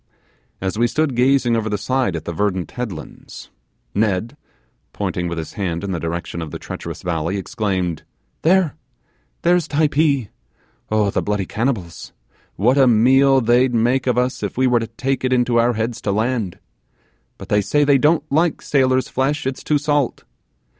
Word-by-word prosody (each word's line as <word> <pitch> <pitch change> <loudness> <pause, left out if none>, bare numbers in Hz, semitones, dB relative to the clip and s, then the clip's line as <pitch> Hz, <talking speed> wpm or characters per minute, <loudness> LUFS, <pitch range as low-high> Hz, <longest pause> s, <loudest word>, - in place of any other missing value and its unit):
As 95 +3 -3
we 120 - +4
stood 150 +1 0
gazing 125 -1 +3
over 110 -1 -1
the 105 - -1
side 130 -3 0
at 80 - -5
the 85 - -4
verdant 95 -2 -1
headlands, 105 -11 -8 0.4
Ned, 110 +4 0 0.6
pointing 90 0 -2
with 85 0 -4
his 80 -2 -6
hand 90 -4 -3
in 100 - -3
the 85 - -2
direction 85 +1 -4
of 80 - -5
the - - -6
treacherous - - -7
valley, 85 +2 -1
exclaimed, 95 - -2 0.4
'There 175 -2 +3 0.7
there's 175 -2 +3
Typee. 145 -5 +1 0.6
Oh, 105 -2 +2
the - - 0
bloody 105 -2 -1
cannibals, 105 - -3 0.4
what 125 +8 +3
a 135 - +6
meal 130 +4 +5
they'd 120 +2 +3
make 120 +3 +1
of 125 -1 +1
us 125 +1 0
if - - -4
we 130 - +3
were 125 -2 +3
to 115 - -4
take 135 0 -2
it 130 - 0
into 125 -2 +2
our 120 +1 +3
heads 115 +1 -3
to 100 - -1
land! 110 -2 -1 0.8
but 95 - -11
they 105 -2 +3
say 145 +8 +2
they 140 -1 +4
don't 150 +2 +3
like 160 +2 +1
sailor's 130 -2 +2
flesh, 145 +4 -1
it's 130 0 -3
too 150 - +2
salt. 145 -3 0
120 Hz, 175 wpm, -20 LUFS, 100-135 Hz, 0.8 s, a